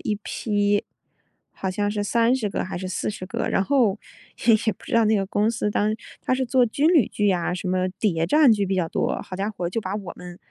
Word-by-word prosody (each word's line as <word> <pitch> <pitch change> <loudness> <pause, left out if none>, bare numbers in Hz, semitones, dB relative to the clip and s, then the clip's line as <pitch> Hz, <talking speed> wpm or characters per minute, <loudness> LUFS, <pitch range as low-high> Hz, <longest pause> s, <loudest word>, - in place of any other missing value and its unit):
一 210 - -2
批， 205 -1 0 0.7
好 190 - -4
像 205 +2 -1
是 205 0 -2
30 230 +1 +1
个 - - -2
还 185 - -5
是 185 +1 -4
40 185 +1 -3
个。 185 - -3
然 195 - +2
后 225 -5 +2 0.5
也 - - +9
也 220 - +3
不 - - -18
知 - - -9
道 230 - +5
那 215 +1 +3
个 195 - +1
公 205 +2 0
司 225 -2 -1
当 205 +1 +1
时 215 - -2 0.2
它 255 - 0
是 260 - 0
做 250 0 +3
军 280 +7 +1
旅 295 - +5
剧 205 -1 0
呀， 180 -2 0
什 185 0 -4
么 185 0 +1
谍 165 -6 +1
战 300 - +5
剧 205 -3 +2
比 190 - -1
较 175 -3 0
多， - - -1
好 185 - -8
家 200 +2 -1
伙 180 -5 -4
就 225 - -2
把 190 -1 -4
我 200 -4 -5
们， 180 -1 -10
205 Hz, 250 characters per minute, -24 LUFS, 185-225 Hz, 0.7 s, 也